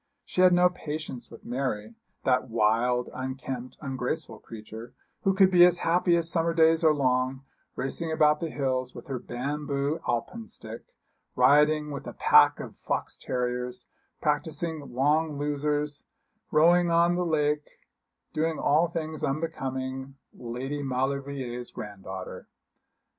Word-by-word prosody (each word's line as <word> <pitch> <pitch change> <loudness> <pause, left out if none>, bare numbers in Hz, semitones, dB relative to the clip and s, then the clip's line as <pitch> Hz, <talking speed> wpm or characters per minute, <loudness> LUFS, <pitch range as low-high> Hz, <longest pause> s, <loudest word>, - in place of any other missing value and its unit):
She 185 - -1
had 185 0 +7
no 180 0 +6
patience 155 -7 -6
with 115 - -14
Mary 120 -4 -3 0.3
that 130 -1 +1
wild, 115 +3 +1
unkempt, 130 -1 -5
ungraceful 130 -3 -3
creature, 110 +1 -10 0.3
who 195 0 +2
could 190 -1 +5
be 175 -1 +7
as 175 0 +6
happy 175 +1 +2
as 170 -1 0
summer 165 0 0
days 160 0 +4
are 160 - +6
long, 130 -2 0 0.3
racing 160 +5 -3
about 150 -1 +4
the 165 - -3
hills 130 -3 -2
with - - -9
her 135 -3 -4
bamboo 140 +3 -2
alpenstock, 120 - -4 0.5
rioting 150 +3 +4
with 140 - -6
a - - -6
pack - - +5
of - - -8
fox - - -3
terriers, 125 0 -3 0.3
practising 155 0 -2
long 150 +4 +1
losers, 145 0 -1 0.5
rowing 170 +3 +5
on 170 +1 +4
the 180 0 0
lake, 150 -3 0 0.6
doing 160 +1 0
all 155 +4 +3
things 160 -2 -5
unbecoming 135 -2 -3 0.2
Lady 130 +5 -5
Maulevrier's 135 -2 -3
granddaughter. 95 -3 -8
140 Hz, 130 wpm, -27 LUFS, 125-160 Hz, 0.6 s, had